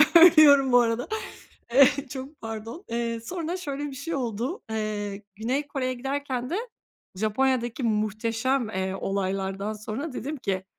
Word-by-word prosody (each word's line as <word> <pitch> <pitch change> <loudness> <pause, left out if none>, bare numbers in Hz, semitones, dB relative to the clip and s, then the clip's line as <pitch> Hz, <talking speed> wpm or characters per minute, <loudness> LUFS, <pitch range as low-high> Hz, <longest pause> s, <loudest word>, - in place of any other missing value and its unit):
Ölüyorum 310 -6 +8
bu 245 - +7
arada. 235 0 +1 0.7
Eee, 275 +2 +5
çok 270 +3 -8
pardon. 225 - -6
Eee, 230 0 -1
sonra 340 +7 -4
şöyle 290 -5 -4
bir 280 -2 -6
şey 300 +4 -4
oldu, 245 - -2
eee, 210 -2 -3
Güney 255 +7 -1
Kore'ye 260 -2 -2
giderken 260 -1 -3
de 345 - -1 0.6
Japonya'daki 240 +4 0
muhteşem, 225 +3 0
eee, 190 -2 -2
olaylardan 195 +1 -2
sonra 215 +8 -5
dedim 280 +5 -4
ki, 190 -8 -2
245 Hz, 135 wpm, -26 LUFS, 215-280 Hz, 0.7 s, Ölüyorum